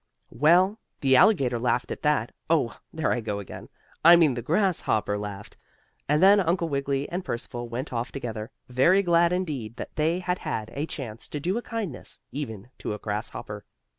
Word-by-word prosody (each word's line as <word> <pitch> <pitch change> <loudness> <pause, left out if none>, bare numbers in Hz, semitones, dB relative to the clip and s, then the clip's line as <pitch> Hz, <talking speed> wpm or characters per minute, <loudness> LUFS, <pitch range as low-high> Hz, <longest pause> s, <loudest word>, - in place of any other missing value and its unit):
Well, 175 - +4 0.2
the 135 -1 +4
alligator 130 - +4
laughed 125 +1 0
at - - -5
that 150 -7 +1 0.2
oh 155 -8 +2 0.2
there 160 -1 -1
I 120 - 0
go 105 -2 -3
again 100 -3 -9 0.3
I 170 +2 +10
mean 160 -5 +4
the 120 - -4
grasshopper 155 - +1
laughed, 105 -1 -7 0.5
and 150 +4 +3
then 200 +2 +7
Uncle 170 -2 +1
Wiggily 140 -1 -1
and 180 +2 -3
Percival 120 -4 -5
went 125 +4 -5
off 120 +2 -2
together, 115 -4 -5 0.2
very 170 +11 +4
glad 170 -1 +4
indeed 145 - -3
that - - -8
they 160 +3 +2
had 180 0 -2
had 110 -1 -4
a 145 +3 -3
chance 115 -7 -6
to 150 - -4
do 180 +7 -1
a 235 - -1
kindness, 220 - -5
even 120 -5 -6
to 105 - -3
a - - -6
grasshopper. 105 0 -5
140 Hz, 180 wpm, -26 LUFS, 115-170 Hz, 0.5 s, I